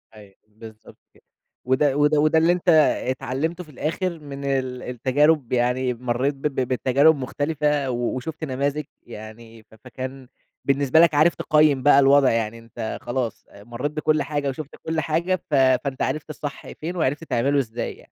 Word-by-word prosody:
أيوه، 100 -2 -15
بالضبط 110 0 -14 0.2
كده. - - -25 0.4
وده 135 +2 +2
وده 145 +1 +3
وده 155 +2 +3
اللي 165 +2 +4
أنت 180 0 -1 0.4
اتعلّمته 135 +7 -3
في 155 - -16
الآخر 170 +5 -3
من 140 -2 -8
ال 130 -2 -2
التجارب، 130 +3 +1
يعني 125 +1 +1
مرّيت 125 +3 -1
ب 135 - -19
ب 140 - -7
بتجارب 135 +5 +3
مختلفة 145 +1 -1
و - - -2 0.2
وشُفت 155 +5 -6
نماذج 140 +2 -2 0.2
يعني 110 0 -12
ف 110 - -20
فكان 130 0 -8 0.4
بالنسبة 140 +2 +3
لك 170 -1 +5
عارف 155 +4 +4
تقيِّم 150 -4 +2
بقى 145 -1 +6
الوضع. 135 -1 +5
يعني 115 0 -2
أنت 115 -1 -6
خلاص 120 -2 -4
أ 100 - -15
مرّيت 120 +6 -4
بكُل 155 0 0
حاجة 145 -2 -2
وشُفت 145 +2 -7
كُل 160 0 -2
حاجة، 165 +4 0
ف 170 -4 -11
فأنت 130 0 +2
عرفت 155 0 -2
الصح 145 -1 -7
فين 170 +4 -6
وعرفت 155 -2 -1
تعمله 140 0 +1
إزاي 120 -2 -4
يعني. - - -19
140 Hz, 170 wpm, -23 LUFS, 125-150 Hz, 0.4 s, بقى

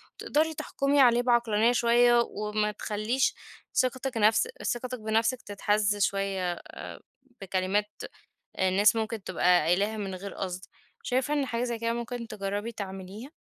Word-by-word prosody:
وتقدري 315 +2 0
تحكمي 280 -1 +1
عليه 245 -2 +5
بعقلانية 235 -2 +3
شوية 240 0 +4
وما 210 0 -2
تخليش 215 +5 -1 0.4
ثقتِك 255 0 0
نفس 220 - +4 0.2
ثقتِك 250 0 -3
بنفسِك 225 +3 0
تتهز 205 0 0
شوية 195 -2 0
آآ، - - -11 0.8
بكلمات 195 +2 -1 0.7
الناس 195 +4 +4
ممكن 220 -2 -3
تبقى 180 -1 +3
قايلاها 200 +7 +1
من 195 -2 -4
غير 195 +2 -7
قصد. 185 -1 -4 0.4
شايفة 260 +3 0
إن 280 -2 +1
حاجة 235 -1 -2
زي 240 -2 -3
كده 230 0 0
ممكن 235 0 -5
تجربي 205 +2 -4
تعمليها؟ 195 +5 -8
215 Hz, 135 wpm, -28 LUFS, 200-240 Hz, 0.8 s, عليه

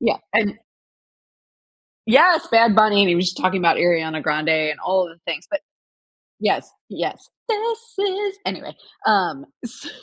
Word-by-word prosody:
Yeah, 225 -3 0 0.2
and 215 -1 +1 1.5
Yes! 335 +8 +5
Bad 230 -2 +5
Bunny, 215 -2 +5
and 200 - +5
he 175 - +3
was 180 +2 +1
just 180 - -2
talking 185 +1 0
about 170 - +3
Ariana 160 -3 0
Grande, 155 +1 -1
and 155 -1 0
all 185 0 +1
of 170 - -10
the - - -37
things, 160 +2 -6
but 300 - -2 0.8
Yes, - - 0 0.2
yes. - - -6 0.2
This 450 +1 -2 0.2
is 400 0 -2
anyway, - - -6 0.3
um, 215 +7 +1 0.2
so 240 +1 -10
205 Hz, 155 wpm, -20 LUFS, 170-275 Hz, 1.5 s, Yes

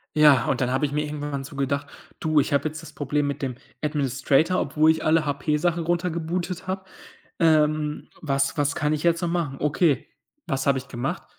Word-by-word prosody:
Ja, 150 -5 +6
und 130 - 0
dann 125 - +1
habe 130 +3 +1
ich 140 - -3
mir 150 +1 0
irgendwann 145 -2 -4
so 140 - -10
gedacht: 140 +1 -1 0.3
„Du, 155 -1 +2
ich 145 - 0
habe 140 +2 +2
jetzt 155 +1 -7
das - - -11
Problem 145 0 -1
mit 145 0 -3
dem 130 -3 -2 0.3
Administrator, 145 +3 +1
obwohl 155 +3 +3
ich 160 - -2
alle 155 0 +3
HP 145 +1 0
Sachen 170 +1 0
runtergebootet 175 +1 -2
habe. 190 0 -3 0.6
Ähm, 155 -2 +2
was 140 -2 0
was 145 0 +1
kann 150 0 +1
ich 150 - -2
jetzt 170 0 +2
noch 175 - 0
machen?" 165 -6 -1
Okay, 150 -2 +1 0.4
was 135 -3 -2
habe 135 -1 +4
ich 135 +1 -6
gemacht? 135 +9 -3
150 Hz, 200 wpm, -24 LUFS, 140-160 Hz, 0.6 s, Ja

